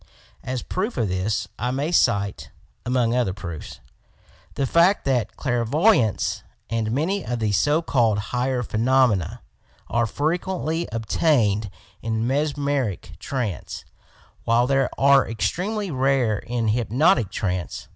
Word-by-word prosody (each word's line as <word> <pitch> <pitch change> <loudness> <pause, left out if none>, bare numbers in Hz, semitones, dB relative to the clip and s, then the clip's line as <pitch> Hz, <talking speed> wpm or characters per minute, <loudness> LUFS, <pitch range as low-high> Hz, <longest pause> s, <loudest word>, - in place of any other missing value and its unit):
As 130 0 -3
proof 210 +6 -3
of 110 -4 0
this, 95 +4 -1
I 125 - -1
may 140 +6 -1
cite 100 - +1 0.4
(among 120 -2 +1
other 115 -7 0
proofs) 85 -6 -8 0.7
the 140 - 0
fact 170 +8 +3
that 125 -5 0
clairvoyance 125 - +1 0.3
and 115 -1 -1
many 170 - 0
of 120 - -3
the 110 -2 0
so 145 - +2
called 115 -8 +2 0.2
higher 125 0 0
phenomena 115 -5 +1 0.5
are 120 +1 +1
frequently 165 - -2
obtained 110 -2 +1 0.3
in 110 0 -1
mesmeric 140 - -1
trance, 115 - -4 0.6
while 115 +1 +3
they 135 0 +2
are 140 -1 +5
extremely 190 - -2
rare 130 -5 +1
in 115 -2 -2
hypnotic 120 - +2
trance. 90 -5 -3
125 Hz, 120 wpm, -23 LUFS, 110-145 Hz, 0.7 s, are